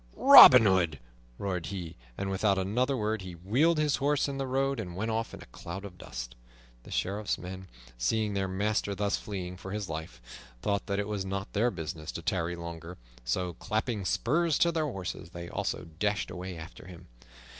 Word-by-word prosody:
"Robin 190 Hz, -, +10 dB
Hood!" 90 Hz, -6 st, +2 dB, 0.4 s
roared 90 Hz, -5 st, -3 dB
he, 90 Hz, -3 st, -6 dB, 0.2 s
and 95 Hz, 0 st, -2 dB
without 100 Hz, +1 st, +2 dB
another 125 Hz, +8 st, 0 dB
word 110 Hz, -1 st, -1 dB
he 95 Hz, -1 st, -7 dB
wheeled 125 Hz, -, +2 dB
his 150 Hz, -2 st, +2 dB
horse 145 Hz, +1 st, +1 dB
in 140 Hz, -1 st, -4 dB
the 135 Hz, -, -2 dB
road 135 Hz, 0 st, 0 dB
and 90 Hz, -5 st, -5 dB
went 110 Hz, +4 st, -2 dB
off 115 Hz, +1 st, -2 dB
in -, -, -10 dB
a -, -, -21 dB
cloud 95 Hz, +4 st, -7 dB
of 90 Hz, -3 st, -11 dB
dust. -, -, -7 dB, 0.5 s
The -, -, -15 dB
Sheriff's 100 Hz, +1 st, -1 dB
men, 95 Hz, +1 st, -8 dB, 0.3 s
seeing 105 Hz, -, 0 dB
their 95 Hz, -1 st, -1 dB
master 100 Hz, +1 st, -1 dB
thus 100 Hz, 0 st, 0 dB
fleeing 90 Hz, -3 st, -6 dB
for 95 Hz, +1 st, -9 dB
his 105 Hz, -2 st, -4 dB
life, 80 Hz, -7 st, -6 dB, 0.4 s
thought 100 Hz, -1 st, -1 dB
that 100 Hz, -1 st, -1 dB
it 105 Hz, 0 st, -1 dB
was 105 Hz, -2 st, -2 dB
not 95 Hz, 0 st, -4 dB
their 115 Hz, +4 st, +2 dB
business 80 Hz, -5 st, -6 dB
to 85 Hz, -, -6 dB
tarry 85 Hz, 0 st, -1 dB
longer, 85 Hz, +1 st, -8 dB, 0.3 s
so, 90 Hz, +9 st, -1 dB
clapping 110 Hz, +3 st, -2 dB
spurs 155 Hz, -, +1 dB
to 170 Hz, -, +3 dB
their 160 Hz, -2 st, 0 dB
horses, 95 Hz, -, -5 dB
they 85 Hz, -1 st, -8 dB
also -, -, -3 dB
dashed 105 Hz, -1 st, 0 dB
away 90 Hz, 0 st, -6 dB
after 80 Hz, +3 st, -10 dB
him. 90 Hz, -2 st, -12 dB
95 Hz, 190 wpm, -29 LUFS, 90-110 Hz, 0.5 s, Robin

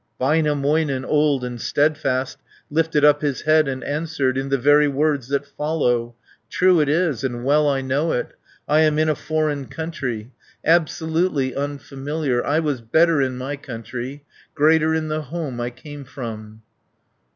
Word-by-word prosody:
Väinämöinen, 145 Hz, -1 st, +1 dB
old 150 Hz, -3 st, +2 dB
and 120 Hz, -2 st, -5 dB
steadfast, 140 Hz, -3 st, 0 dB, 0.3 s
Lifted 155 Hz, -1 st, +2 dB
up 145 Hz, 0 st, +5 dB
his 145 Hz, -3 st, -1 dB
head 155 Hz, -1 st, +3 dB
and 130 Hz, -1 st, -4 dB
answered 145 Hz, -3 st, -1 dB
In 135 Hz, +1 st, -2 dB
the 135 Hz, -, +2 dB
very 145 Hz, +3 st, +4 dB
words 140 Hz, -2 st, 0 dB
that 140 Hz, +1 st, -1 dB
follow: 125 Hz, -6 st, -1 dB, 0.3 s
"True 180 Hz, -2 st, +4 dB
it 150 Hz, -2 st, +2 dB
is, 155 Hz, -6 st, +1 dB
and 120 Hz, -2 st, -3 dB
well 150 Hz, +1 st, +3 dB
I 135 Hz, -1 st, 0 dB
know 140 Hz, +5 st, 0 dB
it, 120 Hz, -, -2 dB, 0.3 s
I 150 Hz, +1 st, +3 dB
am 155 Hz, -1 st, +3 dB
in 155 Hz, 0 st, +2 dB
a 155 Hz, -, +2 dB
foreign 150 Hz, -3 st, -2 dB
country, 130 Hz, -8 st, -5 dB, 0.3 s
Absolutely 160 Hz, -3 st, +1 dB
unfamiliar. 140 Hz, -1 st, -3 dB
200 -, -, -2 dB
I 155 Hz, -, +3 dB
was 145 Hz, -6 st, -2 dB
better 160 Hz, +6 st, +3 dB
in 130 Hz, -1 st, -1 dB
my 135 Hz, +3 st, -4 dB
country, 130 Hz, +1 st, -7 dB, 0.3 s
Greater 160 Hz, +1 st, +3 dB
in 160 Hz, -1 st, -1 dB
the 155 Hz, 0 st, -1 dB
home 145 Hz, -4 st, -5 dB
I 120 Hz, -, -2 dB
came 140 Hz, +4 st, -10 dB
from." 110 Hz, -4 st, -8 dB
145 Hz, 160 wpm, -22 LUFS, 130-155 Hz, 0.3 s, up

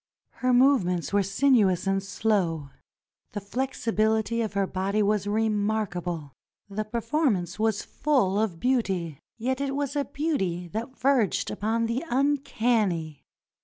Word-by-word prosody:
Her 255 Hz, 0 st, +2 dB
movements 245 Hz, -10 st, +3 dB
were 205 Hz, -, +4 dB
sinuous 195 Hz, -3 st, +3 dB
and 195 Hz, 0 st, +1 dB
slow; 185 Hz, -7 st, -1 dB, 0.6 s
the 205 Hz, -, -2 dB
flexibility 220 Hz, 0 st, 0 dB
of 220 Hz, -3 st, -2 dB
her 200 Hz, 0 st, +1 dB
body 195 Hz, +3 st, 0 dB
was 205 Hz, -1 st, +1 dB
remarkable. 205 Hz, -7 st, -1 dB, 0.3 s
The 210 Hz, +2 st, -4 dB
performance 215 Hz, -, -1 dB
was 220 Hz, -1 st, +1 dB
full 230 Hz, -10 st, +1 dB
of 205 Hz, -7 st, -1 dB
beauty, 190 Hz, -, 0 dB, 0.2 s
yet 255 Hz, +3 st, -1 dB
it 275 Hz, -1 st, -1 dB
was 285 Hz, 0 st, -2 dB
a 285 Hz, -1 st, 0 dB
beauty 190 Hz, -, -2 dB
that 235 Hz, -, -5 dB
verged 255 Hz, -7 st, +2 dB
upon 225 Hz, +3 st, 0 dB
the 230 Hz, +6 st, -2 dB
uncanny. 230 Hz, -, 0 dB
215 Hz, 130 wpm, -26 LUFS, 190-250 Hz, 0.6 s, were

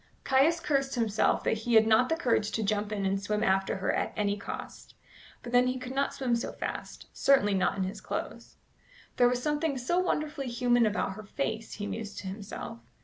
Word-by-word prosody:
Caius 280 Hz, +6 st, +3 dB
cursed 275 Hz, -4 st, 0 dB
himself 225 Hz, -3 st, +1 dB
that 225 Hz, -, 0 dB
he 235 Hz, +1 st, 0 dB
had 220 Hz, 0 st, +7 dB
not 225 Hz, +3 st, +4 dB
the 325 Hz, -, +2 dB
courage 235 Hz, -9 st, +1 dB
to 225 Hz, -, 0 dB
jump 210 Hz, 0 st, -1 dB
in 200 Hz, -2 st, -2 dB
and 195 Hz, +1 st, 0 dB
swim 210 Hz, +1 st, -1 dB
after 195 Hz, 0 st, +2 dB
her 190 Hz, -, 0 dB
at -, -, -1 dB
any 205 Hz, -1 st, +1 dB
cost. 205 Hz, -, -8 dB, 0.5 s
But 240 Hz, -, -7 dB
then 245 Hz, +1 st, +5 dB
he 255 Hz, +1 st, -1 dB
could 255 Hz, 0 st, -6 dB
not 275 Hz, +1 st, +1 dB
swim 265 Hz, -4 st, 0 dB
so 235 Hz, -, -3 dB
fast -, -, -6 dB
certainly 265 Hz, -7 st, +3 dB
not 190 Hz, +1 st, +1 dB
in 190 Hz, -, 0 dB
his 195 Hz, +3 st, -5 dB
clothes. -, -, -5 dB, 0.6 s
"There 245 Hz, -1 st, +6 dB
was 250 Hz, 0 st, -1 dB
something 295 Hz, -1 st, 0 dB
so 305 Hz, +9 st, 0 dB
wonderfully 300 Hz, -6 st, -1 dB
human 240 Hz, -1 st, +3 dB
about 205 Hz, -2 st, -1 dB
her 215 Hz, -, -9 dB
face," 220 Hz, 0 st, -3 dB
he 205 Hz, -, -5 dB
mused 210 Hz, -1 st, -5 dB
to 190 Hz, -, -6 dB
himself. 195 Hz, -, -7 dB
230 Hz, 205 wpm, -29 LUFS, 205-265 Hz, 0.6 s, had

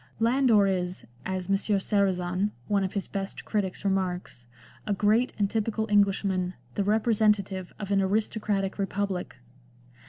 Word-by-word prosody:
Landor 230 Hz, -3 st, +4 dB
is, 185 Hz, -2 st, -2 dB, 0.2 s
as 185 Hz, -1 st, -3 dB
M. 195 Hz, -, +3 dB
Sarrazin, 195 Hz, -2 st, +1 dB, 0.2 s
one 200 Hz, -1 st, +2 dB
of 190 Hz, -, -3 dB
his 200 Hz, -, -2 dB
best 195 Hz, 0 st, -5 dB
critics, 200 Hz, -3 st, -2 dB
remarks, 180 Hz, -10 st, -2 dB, 0.4 s
a 205 Hz, -, +1 dB
great 215 Hz, +5 st, +3 dB
and 205 Hz, -1 st, +2 dB
typical 220 Hz, +1 st, -1 dB
Englishman, 195 Hz, -2 st, +2 dB, 0.2 s
the 200 Hz, -, 0 dB
representative 210 Hz, -3 st, +1 dB
of 205 Hz, -2 st, -5 dB
an 195 Hz, -1 st, +3 dB
"aristocratic 205 Hz, 0 st, -1 dB
republic." 195 Hz, -1 st, -2 dB
200 Hz, 130 wpm, -27 LUFS, 190-210 Hz, 0.4 s, Landor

